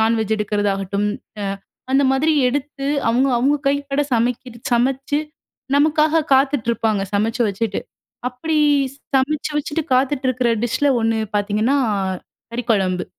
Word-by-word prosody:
Non veg 220 -1 +2
எடுக்கிறதாகட்டும், 205 -1 -1 0.3
அ - - -3 0.5
அந்தமாரி 270 +3 +3 0.2
எடுத்து, 275 +1 -3 0.2
அவுங்க, 250 +4 +3
அவுங்க 275 +4 +2
கைப்பட 280 0 0
சமைக்கிற 240 +1 -1 0.2
சமச்சு 270 +4 +1 0.6
நமக்காக 310 +2 +3
காத்துட்ருப்பாங்க. 235 -6 +1
சமைச்சு 225 +4 +1
வச்சுட்டு. 200 +1 -2 0.5
அப்பிடி 305 +6 -2 0.6
சமச்சு 285 +3 +1
வச்சுட்டு 295 +2 -1
காத்துட்டு 265 +1 +1
இருக்கிற 255 -1 +1 0.2
டிஷ்ல 255 +5 +1
ஒன்னு 225 0 +1 0.2
பார்த்தீங்கன்னா, 210 +6 +1 0.8
கறிக்குழம்பு. 200 -7 0
250 Hz, 105 wpm, -20 LUFS, 220-280 Hz, 0.8 s, அந்தமாரி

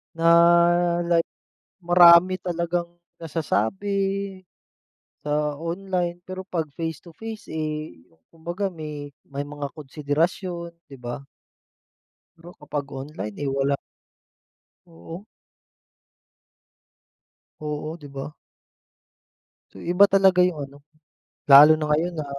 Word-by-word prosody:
Na, 165 - -5 0.8
like 170 -1 +1 0.6
marami 175 +1 +6
talagang 170 0 -2 0.3
nasasabi, 195 - -2 0.8
sa 150 0 -1
online, 175 +2 -3
pero 185 0 -6
'pag 170 -4 -3
face 160 -3 -4
to 170 -2 -16
face 225 -1 -8
eh, 155 -1 -4 0.3
kumbaga 175 +5 -4
may 150 -5 -7 0.2
may 140 +1 -6
mga 145 -1 -6
konsiderasyon, 165 +4 -3 0.2
'di 135 - -11
ba? 120 +2 -6 1.1
Pero 170 +2 -13
kapag 145 -1 -4 0.2
online 135 -8 -7
eh, 140 - -1
wala. 140 +1 +1 1.1
Oo. 170 +2 -11 2.3
Oo, 155 +1 -5
'di 145 -3 -12
ba? 135 0 -6 1.4
So - - -12
iba 180 +4 +5
talaga 190 -1 +4
'yong 170 -4 -5
ano, 140 +1 -16 0.7
lalo 150 +2 +9
na 155 - -2
ngayon 160 +4 0
na, 155 - -3
165 Hz, 100 wpm, -24 LUFS, 150-180 Hz, 2.3 s, lalo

